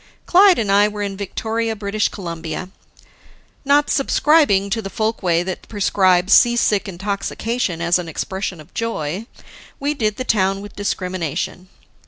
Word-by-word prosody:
Clyde 375 0 +6
and 210 -3 0
I 205 +1 +5
were 210 0 -4
in 200 -1 -3
Victoria, 225 +3 -3
British 205 0 -1
Columbia. 170 -1 -6 0.9
Not 285 +1 +3
subscribing 275 -8 +3
to 225 - 0
the 195 - -6
folkway 195 -6 0
that 185 0 -6
prescribes 190 -3 +2
seasick 235 -4 +4
intoxication 200 +1 -3
as 170 +1 +2
an 170 -2 -6
expression 190 +2 -4
of 155 +3 -15
joy, 210 -3 -3 0.5
we 285 +1 0
did 215 -7 -1
the 255 - -2
town 195 -5 +1
with 205 0 -10
discrimination. 185 -2 -3
200 Hz, 140 wpm, -20 LUFS, 185-225 Hz, 0.9 s, Clyde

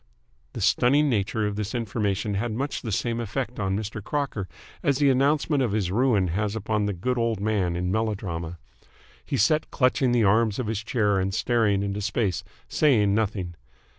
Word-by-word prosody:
The - - -5
stunning 145 +4 +3
nature 105 0 0
of 105 -1 -2
this 105 +2 -3
information 105 -3 -1
had 110 +4 -1
much 140 +5 -3
the 115 - -4
same 115 +4 -1
effect 120 +1 -4
on 95 -1 0
Mr. 105 -1 -5
Crocker 135 -9 -2 0.3
as 140 -2 +1
the 140 -1 +4
announcement 145 +2 +2
of 120 -6 0
his 100 -4 0
ruin 105 -4 +2
has 105 +4 -1
upon 105 -1 -1
the 105 - -1
Good 125 +8 -2
Old 115 -3 0
Man 100 -4 0
in 90 +1 -1
melodrama. 95 -6 -2 0.7
He - - -2
sat 150 +10 +2
clutching 130 -1 +2
the 120 -2 +3
arms 110 +1 +3
of 130 - -2
his 110 -1 -2
chair 105 -5 +1
and 95 +1 -1
staring 110 -5 +1
into 100 +1 -3
space, 100 -4 -1 0.2
saying 110 -10 +3
nothing. 100 -5 -1
110 Hz, 180 wpm, -25 LUFS, 100-120 Hz, 0.7 s, the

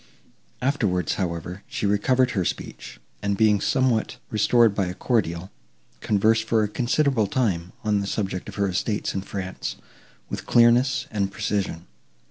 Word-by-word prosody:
Afterwards, 105 - +1
however, 90 0 -4
she - - -3
recovered 125 +6 +2
her 95 - 0
speech, - - -5 0.2
and, 100 -1 -1
being 105 -2 +4
somewhat 130 -3 +1
restored 110 +1 +4
by 100 -2 0
a 90 - -5
cordial, 95 -7 -1 0.5
conversed 110 +2 +2
for 110 -1 +2
a - - +1
considerable 125 +1 +1
time, 95 -7 -1
on 105 -1 +2
the 100 - -3
subject 95 -3 -3
of - - -9
her 100 -1 +1
estates 100 +3 -1
in 95 - -2
France, 95 -1 -5 0.5
with - - -6
clearness 120 +2 +4
and 100 -2 -1
precision. 95 -5 -2
105 Hz, 145 wpm, -24 LUFS, 95-115 Hz, 0.5 s, being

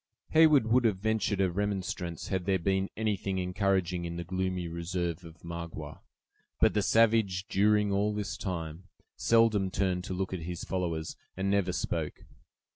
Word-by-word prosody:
Heyward 155 -6 +6
would 120 +3 +3
have 105 -4 +3
ventured 110 -1 0
a 95 -2 +2
remonstrance 95 -3 -3
had 95 -3 -1
there 95 -1 +2
been 95 +2 0
anything 100 -3 -1
encouraging 90 -1 0
in 85 0 -4
the 85 - -4
gloomy 90 0 -2
reserve 85 +1 -3
of 85 0 -13
Magua. 85 -1 -7 0.6
But - - +4
the 105 - +2
savage, 110 -4 +3
during 105 +1 +3
all 100 +2 +2
this 105 -1 -3
time, 85 -2 -5 0.3
seldom 115 -4 +3
turned 90 -1 0
to 95 - -4
look 95 +1 -2
at 95 - -2
his 90 -1 -5
followers, 85 -4 -3 0.2
and 95 +1 0
never 100 -2 +2
spoke. - - -3
95 Hz, 160 wpm, -30 LUFS, 90-105 Hz, 0.6 s, Heyward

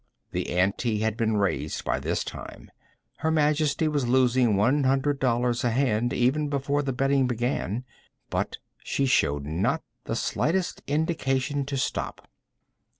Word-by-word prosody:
The - - -2
ante 105 +4 +1
had 110 -1 0
been 110 -1 +1
raised 100 -2 -1
by - - 0
this - - -1
time. - - -9 0.5
Her 160 - 0
Majesty 155 0 +2
was 145 -5 0
losing 125 -3 +3
one 130 +9 +3
hundred 135 +2 +1
dollars 120 -1 +1
a 120 - +3
hand, 120 -1 +1
even 145 +5 +1
before 140 +1 0
the 140 -2 -2
betting 135 +1 +2
began. 120 -2 -1 0.5
But - - -1 0.2
she 140 - -1
showed 75 - +2
not 95 - 0 0.2
the 115 - -2
slightest 175 +9 0
indication 145 -2 0
to 140 -1 -2
stop. 130 - -3
130 Hz, 145 wpm, -26 LUFS, 115-145 Hz, 0.5 s, losing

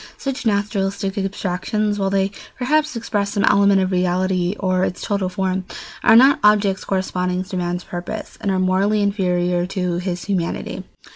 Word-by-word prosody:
Such 270 -3 -3
naturalistic 200 -1 -1
abstractions, 200 +2 -2
while 195 -1 +1
they 195 0 +1 0.3
perhaps 300 +3 +1
express 205 -3 -2
some 200 -2 0
element 200 -1 +4
of 185 0 0
reality 185 0 0
or 185 -1 +1
its 180 - -3
total 200 -3 -1
form, 190 0 -1 0.4
are 225 - +6
not 265 +4 +6
objects 205 -2 +3
corresponding 185 -1 -1
to 190 +1 -8
man's 175 0 -2
purposes 175 0 -6
and 200 - -1
are 190 - +1
morally 195 +3 +2
inferior 180 -3 0
to 180 -2 -2
his 180 -1 -3
humanity. 185 -4 -3
195 Hz, 155 wpm, -20 LUFS, 180-205 Hz, 0.4 s, are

